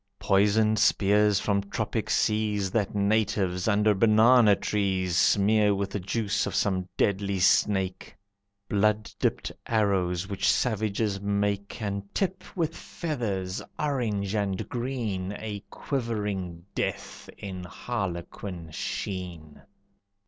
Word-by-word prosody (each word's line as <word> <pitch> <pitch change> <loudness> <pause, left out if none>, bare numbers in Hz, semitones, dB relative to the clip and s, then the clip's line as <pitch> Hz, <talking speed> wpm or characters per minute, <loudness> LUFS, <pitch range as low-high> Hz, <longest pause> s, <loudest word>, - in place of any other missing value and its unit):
Poisoned 105 +2 +3
spears 105 0 +4
from 100 -1 +1
tropic 100 0 -3
seas, 105 -3 +1
That 105 -1 -1
natives, 100 -3 +1
under 105 0 +4
banana 110 +1 +6
trees, 95 -4 -1
Smear 105 +3 +4
with 100 0 -2
the 105 - -2
juice 100 +1 -1
of - - -4
some 95 -2 0
deadly 100 -1 +1
snake. 95 0 +1 0.5
Blood 105 +1 +1
dipped - - 0 0.2
arrows, 95 -5 +1
which 100 -1 0
savages 105 -3 0
make 100 0 -1
And 100 -1 -2
tip 190 -1 -1
with 165 -2 0
feathers, 105 - -3 0.2
orange 110 -9 -1
and 100 -3 -1
green, 115 -7 -3
A 105 -2 -6
quivering 105 - -3
death, - - -4
in 95 -2 -6
harlequin 90 -4 -5
sheen. 85 -4 -5
100 Hz, 110 wpm, -27 LUFS, 95-110 Hz, 0.5 s, banana